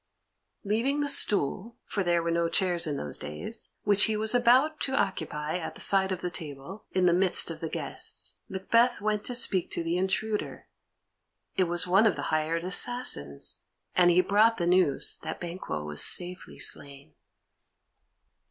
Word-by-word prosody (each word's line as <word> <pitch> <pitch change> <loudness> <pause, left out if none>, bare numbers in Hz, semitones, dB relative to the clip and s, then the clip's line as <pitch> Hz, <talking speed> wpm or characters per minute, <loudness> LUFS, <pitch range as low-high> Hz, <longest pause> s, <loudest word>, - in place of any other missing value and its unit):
Leaving 235 +8 0
the 290 - -1
stool 215 - +2
(for 200 - -3
there 175 -2 +1
were 170 - -1
no 170 0 0
chairs 175 -1 +1
in 145 -2 -3
those 75 - -7
days) 75 +1 -7
which 205 0 +5
he 220 -1 -1
was 220 +1 +2
about 255 +6 +3
to 265 - -1
occupy 160 - -2
at 165 - -7
the - - -12
side 190 -1 +3
of 185 -1 -3
the 180 - -4
table, 160 +4 -9
in 185 -1 +1
the 175 - +4
midst 180 -1 +3
of 160 - -8
the 160 - -5
guests, - - -2
Macbeth 230 +6 +1
went 210 0 -1
to 245 - -2
speak 195 -7 +2
to 170 - -3
the 165 +1 -1
intruder. 205 +3 -2 0.9
It 185 - +2
was 175 0 -1
one 195 +5 +4
of 205 - +1
the - - -5
hired 160 +2 -1
assassins, 180 - 0 0.3
and 175 -1 +5
he 175 +1 +5
brought 215 +4 +3
the 175 - -1
news 175 -5 +1
that - - -6
Banquo 170 - -5
was 75 -1 +1
safely 180 0 -1
slain. 140 - -4
185 Hz, 170 wpm, -27 LUFS, 165-215 Hz, 0.9 s, which